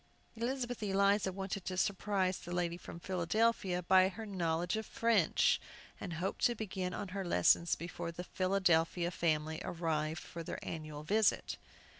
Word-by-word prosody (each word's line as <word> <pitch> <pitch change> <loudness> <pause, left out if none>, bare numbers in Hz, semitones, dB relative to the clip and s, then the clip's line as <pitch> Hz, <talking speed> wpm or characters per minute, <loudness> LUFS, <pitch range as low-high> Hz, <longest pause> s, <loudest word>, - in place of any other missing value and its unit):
Elizabeth 245 +1 -2
Eliza 200 -1 +2
wanted 195 0 -4
to 185 -1 -3
surprise 190 -1 +1
the 175 - -9
lady 175 -1 0
from 170 -1 -9
Philadelphia 185 +1 +1
by 185 +1 +5
her 220 +3 -7
knowledge 175 -3 -1
of 220 0 -3
French, 225 -8 +3 0.4
and 175 - -5
hoped 175 +4 -3
to 240 - +4
begin 190 -4 -3
on 195 +1 -5
her 195 +1 -3
lessons 170 - +3
before 170 0 -5
the 175 +1 -6
Philadelphia 180 -2 +1
family 160 -2 0
arrived 160 -2 -2
for 170 - -7
their 165 - -5
annual 155 -2 -5
visit. 215 +6 +2
185 Hz, 150 wpm, -34 LUFS, 170-200 Hz, 0.4 s, by